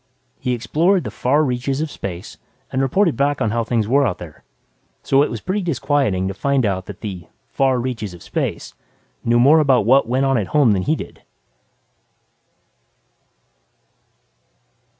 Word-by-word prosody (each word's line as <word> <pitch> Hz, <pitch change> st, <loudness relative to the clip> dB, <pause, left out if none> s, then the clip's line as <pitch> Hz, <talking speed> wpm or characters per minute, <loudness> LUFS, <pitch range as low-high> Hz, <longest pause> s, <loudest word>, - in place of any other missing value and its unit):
He 125 Hz, -, -1 dB
explored 170 Hz, -, +1 dB
the -, -, -5 dB
far 145 Hz, +5 st, +1 dB
reaches 130 Hz, 0 st, -1 dB
of 155 Hz, -1 st, -3 dB
space 90 Hz, -2 st, -7 dB, 0.3 s
and 130 Hz, -, 0 dB
reported 170 Hz, +6 st, +2 dB
back 140 Hz, +1 st, 0 dB
on 110 Hz, -, 0 dB
how 115 Hz, +1 st, 0 dB
things 115 Hz, -2 st, -1 dB
were 140 Hz, +4 st, +3 dB
out 90 Hz, -, -3 dB
there. 80 Hz, -4 st, -12 dB, 0.6 s
So 135 Hz, 0 st, +3 dB
it 145 Hz, -, +1 dB
was 115 Hz, -, -6 dB
pretty 200 Hz, -, -2 dB
disquieting 140 Hz, -, 0 dB
to 95 Hz, -, -3 dB
find 135 Hz, +4 st, 0 dB
out 95 Hz, -2 st, -2 dB
that 105 Hz, -, -9 dB
the 95 Hz, -6 st, -6 dB, 0.2 s
"far 135 Hz, -2 st, +2 dB
reaches 115 Hz, -7 st, -4 dB
of 85 Hz, -, -14 dB
space" -, -, -4 dB, 0.5 s
knew 120 Hz, +1 st, +2 dB
more 145 Hz, +6 st, +6 dB
about 135 Hz, -7 st, +3 dB
what 130 Hz, +3 st, +4 dB
went 130 Hz, +2 st, +1 dB
on 135 Hz, -3 st, +2 dB
at 100 Hz, -, -3 dB
home 135 Hz, -7 st, +5 dB
than 95 Hz, -2 st, +1 dB
he 155 Hz, +12 st, +1 dB
did. -, -, -9 dB
130 Hz, 165 wpm, -20 LUFS, 105-140 Hz, 0.6 s, more